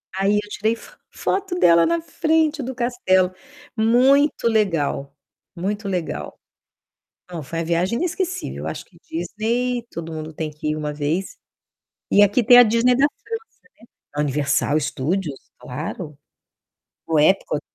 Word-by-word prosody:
Aí 195 +2 +2
eu 210 - -13
tirei 215 +2 0
fo - - -15
foto 385 -2 -2
dela 170 0 +6
na 335 0 +1
frente 320 -2 +1
do 260 0 -5
castelo. 235 -7 +2 0.4
Muito 250 +5 +3
legal, 165 -10 0 0.4
muito 200 +4 -3
legal. 170 - -4 0.9
Não, 165 -3 -5
foi 165 +4 -5
a - - -1
viagem 175 +6 0
inesquecível. 365 +3 -3
Acho - - -5
que - - -23
Disney 245 -4 -2
todo 165 -4 -7
mundo 160 0 -6
tem 155 0 -4
que 150 0 -4
ir - - -2
uma 150 -1 -3
vez. 155 +6 -2 0.7
E 205 - +6
aqui 205 +4 +4
tem 245 +3 +8
a 245 - +10
Disney 230 +3 +3
da 275 +3 +4
França, - - -22
né. 455 - 0 0.8
A 150 - 0
Universal 145 +1 +1
Studios, 150 +1 -2 0.2
claro. 150 +3 -6 0.9
O 160 -1 +1
Epcot 150 -1 +2
195 Hz, 145 wpm, -22 LUFS, 155-245 Hz, 0.9 s, a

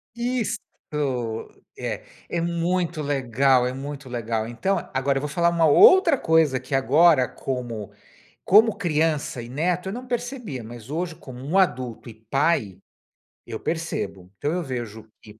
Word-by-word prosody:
Isto. 235 -2 -1 1.2
É, - - -4 0.2
é 170 - -2
muito 170 -1 -1
legal, 135 -2 +2
é 125 - -3
muito 140 0 -7
legal, 115 -2 -2
então 190 +12 -2
agora 135 +1 0
eu - - -1
vou 150 - -3
falar 170 +3 +2
uma 165 -2 +3
outra 335 - +7
coisa 160 - +3
aqui 130 +2 -8
agora, 140 +1 +5
como 120 -5 -5 0.5
como 215 +2 +5
criança 155 -6 0
e 115 - -8
neto, 175 +7 -1
eu - - -3
não 250 +2 -7
percebia, 240 - -4
mas 120 +2 -10
hoje, 170 +1 -2
como 130 -5 -11
um 155 +8 -2
adulto 130 - 0
e - - -12
pai, 135 - +1 0.7
eu - - -5
percebo. 160 - -4
Então 145 - -1
eu 180 - -1
vejo 120 -7 -6
que 105 +1 -15
145 Hz, 150 wpm, -24 LUFS, 125-175 Hz, 1.2 s, outra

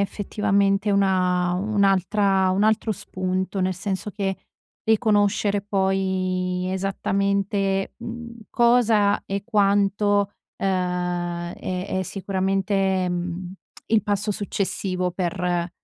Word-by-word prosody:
effettivamente 200 0 +1
una 185 -2 +2
un'altra 195 0 +2
un 190 +2 +1
altro 220 0 +2
spunto 185 +1 -3
nel 185 0 0
senso 195 +2 -3
che 195 -2 -2 0.5
riconoscere 205 -2 +2
poi 185 -2 0
esattamente 195 0 0
mhmm, 235 0 -8
cosa 230 -4 +3
e 195 0 -3
quanto, 205 0 +2 0.2
uhm, 180 -2 -1
è 185 +1 -4
è - - 0
sicuramente, 190 0 0
mhmm, 175 +1 -4 0.3
il 220 -1 +3
passo 205 +1 -1
successivo 190 -2 -2
per 175 -1 -1
195 Hz, 95 wpm, -23 LUFS, 185-205 Hz, 0.5 s, cosa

